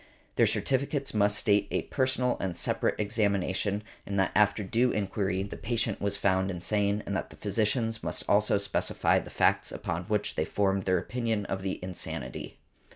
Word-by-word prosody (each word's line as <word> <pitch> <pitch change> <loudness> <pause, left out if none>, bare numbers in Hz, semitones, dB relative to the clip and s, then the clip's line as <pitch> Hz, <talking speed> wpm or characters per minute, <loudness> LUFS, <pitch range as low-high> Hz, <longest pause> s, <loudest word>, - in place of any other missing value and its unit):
Their - - +5
certificates 140 +1 0
must 105 -1 +3
state 105 -2 +3
a - - -1
personal 130 -1 +1
and 90 -3 -3
separate - - 0
examination, 100 -1 0 0.2
and 100 -1 -2
that 95 - +2
after 105 +1 +3
due 115 +6 +2
enquiry 95 -1 -1
the 100 - -6
patient 115 -2 -2
was 100 0 0
found 95 -1 +2
insane; 100 +3 0
and 100 - -2
the - - -4
physicians 110 +2 0
must - - -3
also 105 0 +4
specify 100 0 +1
the - - -9
facts - - +2
upon 85 +1 -4
which 105 +1 -1
they 80 - 0
formed 95 0 0
their 95 -1 +3
opinion 110 +2 -2
of 95 -1 -3
the 95 0 -2
insanity. 80 -8 -5
100 Hz, 165 wpm, -29 LUFS, 95-110 Hz, 0.2 s, Their